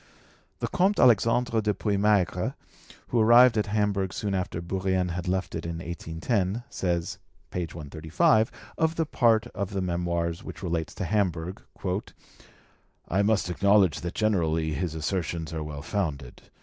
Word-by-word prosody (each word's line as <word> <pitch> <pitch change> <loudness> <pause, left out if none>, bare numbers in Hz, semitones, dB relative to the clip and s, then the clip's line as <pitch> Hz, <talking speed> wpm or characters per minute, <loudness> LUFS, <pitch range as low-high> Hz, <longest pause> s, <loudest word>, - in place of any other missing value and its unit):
The - - 0
Comte 195 +3 +2
Alexandre 115 0 +4
de 105 -1 0
Puymaigre, 100 -2 +1 0.5
who 120 - +1
arrived 120 +2 +7
at 105 -1 +1
Hamburg 100 -2 0
soon 100 -2 -2
after 90 -3 -2
Bourrienne 95 +1 -1
had 90 +1 -4
left 95 -1 -1
it - - -4
in 85 0 -4
1810, 85 +6 -2
says 85 -2 -2 0.3
(page 85 -3 -4
135) 80 +8 +1 0.3
of 160 0 +2
the 165 - 0
part 115 -6 +3
of 100 -1 -3
the 95 - -1
Memoirs 85 -1 -1
which - - -9
relates 85 -3 -2
to - - -3
Hamburg, 90 -3 -1 1.5
"I 95 +4 +1
must 105 -1 +2
acknowledge 100 -3 +3
that 85 0 -5
generally 80 -7 +1
his 80 +2 -2
assertions 80 0 -2
are 80 - -3
well 75 -2 -6
founded. 75 -9 -4
95 Hz, 145 wpm, -27 LUFS, 85-105 Hz, 1.5 s, arrived